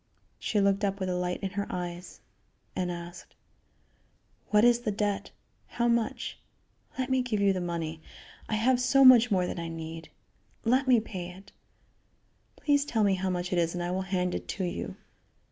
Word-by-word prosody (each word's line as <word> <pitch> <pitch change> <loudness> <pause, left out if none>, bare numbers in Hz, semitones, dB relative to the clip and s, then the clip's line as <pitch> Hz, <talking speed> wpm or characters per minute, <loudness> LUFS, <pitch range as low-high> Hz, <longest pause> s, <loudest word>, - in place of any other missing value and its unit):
She 210 - 0
looked 200 0 +2
up 200 0 0
with 185 -1 -2
a 180 - 0
light 180 +1 -2
in 195 - -2
her 200 0 -3
eyes 175 0 -6 0.5
and 180 -1 -1
asked: 175 0 -9 1.1
"What 210 +1 +5
is 240 -1 +5
the 230 -3 -2
debt? 205 -1 -1 0.4
How 235 0 -1
much? 235 -1 -1 0.6
Let 260 0 -2
me 260 0 +3
give 240 -4 -1
you 200 -1 +4
the 185 - -2
money. 165 -2 -4 0.5
I 215 - +1
have 245 +4 +3
so 270 +2 +5
much 245 -2 +8
more 185 -4 +2
than 175 - -4
I 170 - -4
need. 165 0 -7 0.6
Let 260 +4 +3
me 250 -3 +6
pay 185 -5 -6
it. 190 +2 -13 1.0
Please 285 -1 +2
tell 230 -6 0
me 200 -1 +4
how 190 0 -1
much 180 0 -2
it 175 - +2
is 170 0 0
and 175 - -2
I 175 - -2
will 185 +1 -1
hand 180 -1 0
it - - -4
to 190 - -3
you. 175 - -4
195 Hz, 190 wpm, -29 LUFS, 180-230 Hz, 1.1 s, much